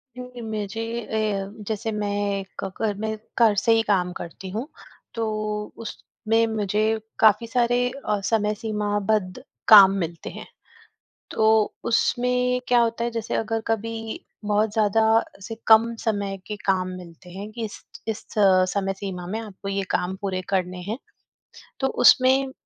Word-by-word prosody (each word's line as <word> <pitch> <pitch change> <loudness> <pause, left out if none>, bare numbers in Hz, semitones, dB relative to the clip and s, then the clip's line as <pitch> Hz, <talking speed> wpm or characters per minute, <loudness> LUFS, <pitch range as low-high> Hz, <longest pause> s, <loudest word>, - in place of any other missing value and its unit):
क्योंकि 250 -1 -8
मुझे 220 -1 -4 0.4
ए 200 -2 -1 0.2
जैसे 220 +1 -2
मैं 205 -1 -1 0.2
घ - - -1
घर 220 -2 +1
में 220 0 -2 0.2
घर 220 -3 +5
से 230 - +2
ही 225 - +4
काम 185 -4 +1
करती 185 +3 -8
हूँ, 225 +8 -4 0.5
तो 230 -1 -1 0.6
उसमें 225 +1 -1
मुझे 210 -1 0 0.4
काफ़ी 220 +1 +5
सारे 245 +1 +2 0.2
अ, 210 -1 +1
समय 210 -1 +1
सीमाबद्ध 210 -2 -1 0.2
काम 200 -3 +10
मिलते 165 0 -6
हैं। - - -9 0.8
तो 220 - +1 0.4
उसमें 250 +1 +1
क्या 245 -1 +5
होता 230 0 0
है, 235 - -1
जैसे 230 -1 -4
अगर 225 0 -1
कभी 225 0 -3 0.2
बहुत 210 +1 +1
ज़्यादा 220 0 +2 0.4
से 225 +3 -6
कम 230 +1 +6
समय 200 -3 -1
के 210 - -4
काम 185 -1 +2
मिलते 180 0 -12
हैं 200 +4 -7
कि, 230 0 -4
"इस 210 - -8 0.2
इस 220 - -3 0.5
समय 195 -1 0
सीमा 185 -3 -5
में 215 +5 -3
आपको 205 -3 -8
ये 195 0 -1
काम 185 +1 -1
पूरे 190 -2 -1
करने 185 -1 0
हैं।" 225 - -2 0.8
तो 265 - +2 0.2
उसमें 265 +1 +6
215 Hz, 150 wpm, -24 LUFS, 195-225 Hz, 0.8 s, काम